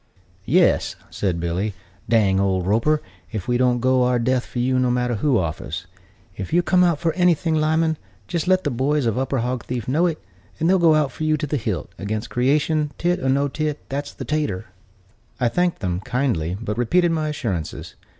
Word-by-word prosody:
"Yes," 170 Hz, -, +3 dB, 0.2 s
said 85 Hz, -1 st, -1 dB
Billy, 90 Hz, +5 st, -2 dB, 0.3 s
"dang 100 Hz, -5 st, +3 dB
old 95 Hz, -2 st, +1 dB
Roper 115 Hz, +10 st, +2 dB, 0.3 s
if 105 Hz, -4 st, -4 dB
we 120 Hz, -, +1 dB
don't 125 Hz, -1 st, +2 dB
go 130 Hz, 0 st, +3 dB
our 125 Hz, 0 st, +3 dB
death 125 Hz, +1 st, 0 dB
for -, -, -8 dB
you, 130 Hz, +1 st, +2 dB
no 125 Hz, -1 st, +2 dB
matter 125 Hz, -1 st, 0 dB
who 135 Hz, +2 st, +2 dB
offers. 80 Hz, -5 st, -3 dB, 0.5 s
If 100 Hz, -, -5 dB
ever -, -, -2 dB
you 175 Hz, -, +4 dB
come 180 Hz, 0 st, +4 dB
out 170 Hz, -3 st, +3 dB
for 165 Hz, +1 st, 0 dB
anything, 175 Hz, -2 st, +2 dB
Lyman, 160 Hz, 0 st, +1 dB, 0.3 s
jist 170 Hz, -, -2 dB
let 185 Hz, 0 st, +3 dB
the 145 Hz, -, 0 dB
boys 135 Hz, +3 st, +1 dB
of 115 Hz, +1 st, 0 dB
Upper 135 Hz, -1 st, 0 dB
Hogthief 125 Hz, -1 st, -3 dB
know 155 Hz, +7 st, +2 dB
it, 165 Hz, -3 st, -2 dB, 0.4 s
and 160 Hz, -, +1 dB
they'll 190 Hz, +1 st, +4 dB
go 155 Hz, -3 st, +4 dB
for 135 Hz, +4 st, -7 dB
you 155 Hz, 0 st, +2 dB
to 150 Hz, -, -2 dB
the 150 Hz, -, -2 dB
hilt, 105 Hz, -, -3 dB
against 105 Hz, +4 st, -3 dB
creation, 150 Hz, +4 st, +1 dB
tit 175 Hz, +1 st, +1 dB
or 130 Hz, -, -1 dB
no 140 Hz, +2 st, +2 dB
tit, 150 Hz, +1 st, -2 dB
that's 145 Hz, +1 st, -3 dB
the -, -, -8 dB
tatur." 150 Hz, -12 st, -1 dB, 0.7 s
I 120 Hz, -, +2 dB
thanked 175 Hz, 0 st, 0 dB
them, 90 Hz, -3 st, -1 dB
kindly, 100 Hz, -, -1 dB
but 110 Hz, 0 st, -3 dB
repeated 175 Hz, +8 st, +3 dB
my 155 Hz, -2 st, 0 dB
assurances. 100 Hz, -, -4 dB
130 Hz, 200 wpm, -22 LUFS, 110-155 Hz, 0.7 s, you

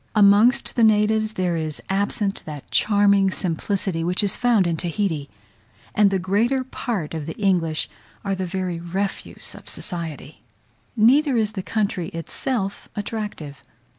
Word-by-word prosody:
Amongst 210 Hz, +4 st, +5 dB
the 235 Hz, -, +3 dB
natives 215 Hz, 0 st, +3 dB
there 180 Hz, -3 st, 0 dB
is 155 Hz, -2 st, -3 dB
absent 200 Hz, +1 st, 0 dB
that 150 Hz, -3 st, -8 dB
charming 200 Hz, -2 st, +4 dB
simplicity 185 Hz, -1 st, -1 dB
which 180 Hz, +4 st, 0 dB
is 200 Hz, -1 st, +1 dB
found 235 Hz, -6 st, +3 dB
in 170 Hz, -1 st, 0 dB
Tahiti; 165 Hz, -3 st, -2 dB, 0.6 s
and 210 Hz, -1 st, +5 dB
the 195 Hz, -, +1 dB
greater 215 Hz, +9 st, +1 dB
part 225 Hz, -, -4 dB
of 160 Hz, -2 st, -4 dB
the 160 Hz, -, -6 dB
English 175 Hz, -6 st, +1 dB, 0.4 s
are 195 Hz, -, 0 dB
the 190 Hz, -1 st, -2 dB
very 180 Hz, -2 st, -3 dB
refuse 190 Hz, +4 st, -4 dB
of -, -, -9 dB
society. 165 Hz, -4 st, -5 dB, 0.6 s
Neither 260 Hz, +5 st, +5 dB
is 215 Hz, -2 st, +1 dB
the 205 Hz, -3 st, -4 dB
country 200 Hz, -4 st, -1 dB
itself 195 Hz, +5 st, -3 dB
attractive. 205 Hz, -, -5 dB
195 Hz, 140 wpm, -23 LUFS, 170-215 Hz, 0.6 s, Amongst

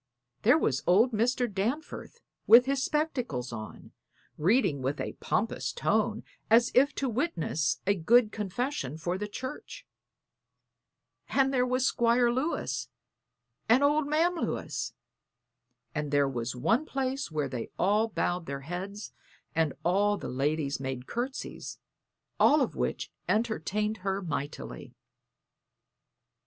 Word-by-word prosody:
There 245 Hz, +8 st, +5 dB
was 135 Hz, -, 0 dB
old 215 Hz, +8 st, +5 dB
Mr. 245 Hz, +3 st, +1 dB
Danforth 240 Hz, -, -4 dB, 0.3 s
with 240 Hz, +2 st, +9 dB
his 275 Hz, 0 st, 0 dB
spectacles 250 Hz, -, -1 dB
on, 110 Hz, -2 st, -8 dB, 0.4 s
reading 185 Hz, -, +2 dB
with 135 Hz, +3 st, -2 dB
a -, -, -3 dB
pompous 220 Hz, +2 st, -1 dB
tone, 220 Hz, +1 st, 0 dB, 0.3 s
as 230 Hz, +2 st, +5 dB
if 280 Hz, +4 st, +4 dB
to 275 Hz, -, -1 dB
witness 180 Hz, -, -1 dB
a 200 Hz, -, +4 dB
good 215 Hz, +5 st, +4 dB
confession 210 Hz, -, -3 dB
for 175 Hz, +3 st, -2 dB
the 210 Hz, -, -3 dB
church; 260 Hz, -, -7 dB, 1.4 s
and 270 Hz, 0 st, +2 dB
there 250 Hz, -1 st, +2 dB
were 255 Hz, 0 st, +1 dB
Squire 240 Hz, -1 st, +3 dB
Lewis 265 Hz, +7 st, -2 dB, 0.8 s
and 250 Hz, +5 st, +5 dB
old 295 Hz, +1 st, +3 dB
Ma'am 325 Hz, +4 st, +2 dB
Lewis; -, -, -3 dB, 1.0 s
and 150 Hz, -1 st, -2 dB
there 145 Hz, -1 st, +3 dB
was 125 Hz, -1 st, -3 dB
one 220 Hz, -, +2 dB
place 270 Hz, 0 st, -2 dB
where 150 Hz, -3 st, -1 dB
they 125 Hz, -3 st, -5 dB
all 210 Hz, +5 st, +3 dB
bowed 180 Hz, -5 st, -2 dB
their 140 Hz, 0 st, -4 dB
heads 190 Hz, +7 st, -6 dB, 0.4 s
and 160 Hz, -2 st, +2 dB
all 205 Hz, +4 st, +3 dB
the -, -, -6 dB
ladies 140 Hz, +1 st, -1 dB
made 130 Hz, -2 st, -4 dB
courtesies 250 Hz, -, -5 dB, 0.6 s
all 300 Hz, +1 st, +6 dB
of -, -, -1 dB
which -, -, -2 dB, 0.2 s
entertained 215 Hz, -1 st, 0 dB
her 195 Hz, 0 st, -2 dB
mightily. 150 Hz, -3 st, -5 dB
210 Hz, 125 wpm, -29 LUFS, 155-255 Hz, 1.4 s, with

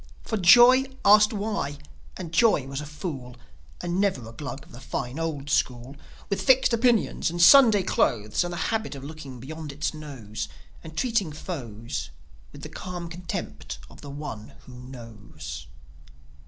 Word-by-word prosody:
For 220 Hz, -, -2 dB
Joi 240 Hz, +7 st, +7 dB, 0.2 s
asked 210 Hz, +1 st, +7 dB
why; 200 Hz, -9 st, -2 dB, 0.4 s
and 175 Hz, -4 st, -6 dB
Joi 165 Hz, -, +4 dB
was 135 Hz, +1 st, -5 dB
a 150 Hz, -, -7 dB
fool, 145 Hz, -5 st, -6 dB, 0.5 s
And 175 Hz, +2 st, -1 dB
never 180 Hz, -, 0 dB
a -, -, -9 dB
Glug 140 Hz, 0 st, -7 dB
of -, -, -19 dB
the 120 Hz, -, -11 dB
fine 130 Hz, +1 st, -4 dB
old 155 Hz, -4 st, -3 dB
school 125 Hz, 0 st, 0 dB, 0.3 s
With 200 Hz, -, -1 dB
fixed 260 Hz, -2 st, +4 dB
opinions 230 Hz, -5 st, +2 dB
and 175 Hz, +1 st, -5 dB
Sunday 215 Hz, +2 st, +8 dB
clothes, 105 Hz, -, +1 dB
And 175 Hz, -, -4 dB
the 175 Hz, -, -4 dB, 0.2 s
habit 220 Hz, -8 st, -2 dB
of 135 Hz, -, -9 dB
looking 140 Hz, -4 st, -9 dB
beyond 155 Hz, +3 st, -7 dB
its 145 Hz, +3 st, -2 dB
nose, 135 Hz, -9 st, -7 dB, 0.3 s
And 160 Hz, -1 st, -11 dB
treating 225 Hz, -10 st, +1 dB
foes 115 Hz, -, -6 dB, 0.4 s
With -, -, -12 dB
the -, -, -5 dB
calm 175 Hz, -2 st, -6 dB
contempt 75 Hz, -, -6 dB
of -, -, -14 dB
the 145 Hz, -, -9 dB
One 125 Hz, -7 st, -7 dB
Who 130 Hz, -, -13 dB
Knows. 115 Hz, -, -9 dB
150 Hz, 160 wpm, -26 LUFS, 125-190 Hz, 0.5 s, Sunday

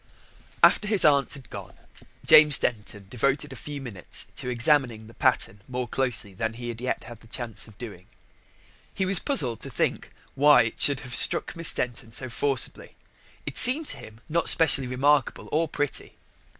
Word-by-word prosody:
After 210 Hz, -, +4 dB
his 210 Hz, -2 st, +2 dB
aunt 140 Hz, -2 st, +2 dB
had 135 Hz, -2 st, -14 dB
gone -, -, -10 dB, 0.5 s
James 150 Hz, -2 st, +7 dB
Denton 105 Hz, -3 st, -4 dB
devoted 140 Hz, +7 st, -2 dB
a -, -, -10 dB
few 145 Hz, -1 st, -8 dB
minutes 115 Hz, -10 st, -4 dB
to 125 Hz, -, -3 dB
examining 120 Hz, -3 st, +1 dB
the 115 Hz, -, -16 dB
pattern 100 Hz, -2 st, -1 dB
more 125 Hz, -1 st, -5 dB
closely 120 Hz, -5 st, -2 dB
than 115 Hz, +4 st, -4 dB
he 120 Hz, +1 st, -8 dB
had 115 Hz, 0 st, -8 dB
yet 125 Hz, -, -3 dB
had 120 Hz, -1 st, -12 dB
a -, -, -18 dB
chance 115 Hz, -1 st, -6 dB
of 105 Hz, -2 st, -18 dB
doing. 105 Hz, -6 st, -11 dB, 0.9 s
He 190 Hz, -, -1 dB
was 190 Hz, 0 st, +3 dB
puzzled 130 Hz, -, 0 dB
to -, -, -6 dB
think -, -, -3 dB, 0.2 s
why 145 Hz, -3 st, +5 dB
it 110 Hz, -, -6 dB
should 140 Hz, -3 st, +3 dB
have 125 Hz, -, -8 dB
struck -, -, +2 dB
Miss 165 Hz, -1 st, +1 dB
Denton 120 Hz, -2 st, -4 dB
so 130 Hz, +2 st, -4 dB
forcibly. 135 Hz, 0 st, -2 dB, 0.5 s
It -, -, -1 dB
seemed 265 Hz, +6 st, +7 dB
to -, -, -4 dB
him 110 Hz, +1 st, -14 dB
not 170 Hz, +1 st, +1 dB
specially 140 Hz, -5 st, +4 dB
remarkable 140 Hz, +3 st, 0 dB
or 160 Hz, +2 st, 0 dB
pretty. 145 Hz, -1 st, -4 dB
125 Hz, 175 wpm, -24 LUFS, 115-145 Hz, 0.9 s, James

